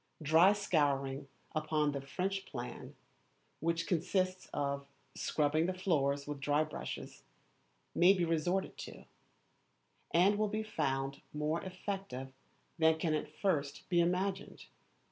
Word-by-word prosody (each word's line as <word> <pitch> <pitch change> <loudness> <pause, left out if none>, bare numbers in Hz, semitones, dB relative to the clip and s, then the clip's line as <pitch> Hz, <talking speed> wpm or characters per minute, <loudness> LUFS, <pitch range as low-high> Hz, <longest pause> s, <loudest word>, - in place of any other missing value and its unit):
Dry 165 +6 +6
scouring 140 -8 +1 0.3
upon 155 -1 +1
the 140 -1 -3
French 190 +7 -2
plan, 120 -3 -7 0.6
which 165 +1 0
consists 185 +2 0
of 140 -1 -2 0.3
scrubbing 155 +2 +1
the 185 - -1
floors 140 -7 +1
with 145 -1 -5
dry 145 +2 +2
brushes, 155 - -6 0.7
may 180 +2 +7
be 180 -3 +2
resorted 170 +4 0
to, - - -8 1.0
and 195 +5 +4
will 215 -1 +2
be 215 +1 -1
found 135 -8 -1
more 150 +2 0
effective 185 -8 -5 0.5
than 160 0 +5
can 160 -1 0
at 150 -1 -1
first 150 -4 -1
be 175 -1 +3
imagined. 190 +3 0
160 Hz, 125 wpm, -34 LUFS, 145-185 Hz, 1.0 s, may